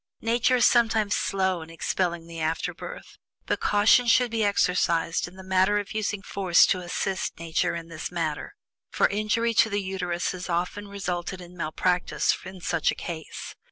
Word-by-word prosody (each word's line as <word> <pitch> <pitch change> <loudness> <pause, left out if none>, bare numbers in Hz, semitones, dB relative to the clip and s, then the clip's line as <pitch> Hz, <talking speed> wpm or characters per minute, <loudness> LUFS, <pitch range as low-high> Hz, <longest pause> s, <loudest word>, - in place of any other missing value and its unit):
Nature 235 +2 +3
is 245 - +4
sometimes 225 -3 +3
slow 190 -3 0
in 160 - -10
expelling 170 0 -2
the 165 0 -8
afterbirth, 160 - -4 0.3
but - - -1
caution 210 +4 +4
should 240 0 +4
be 225 -1 0
exercised 180 -5 +1
in 175 - -13
the 190 - -11
matter 190 +2 +3
of 205 +1 -4
using 210 -2 -2
force 190 -3 +4
to 185 - +1
assist 185 +2 -3
Nature 165 0 -1
in 165 -1 -6
this 165 0 -6
matter, 165 - -3 0.3
for - - +3
injury 215 +3 0
to 225 - +4
the 205 - -1
Uterus 180 -2 -2
has 185 0 -7
often 180 +4 -2
resulted 185 -2 -4
from 180 0 -12
malpractice 180 +2 0
in 190 -1 -9
such 170 -2 +1
a - - 0
case. 160 -2 -7
185 Hz, 170 wpm, -26 LUFS, 170-205 Hz, 0.3 s, is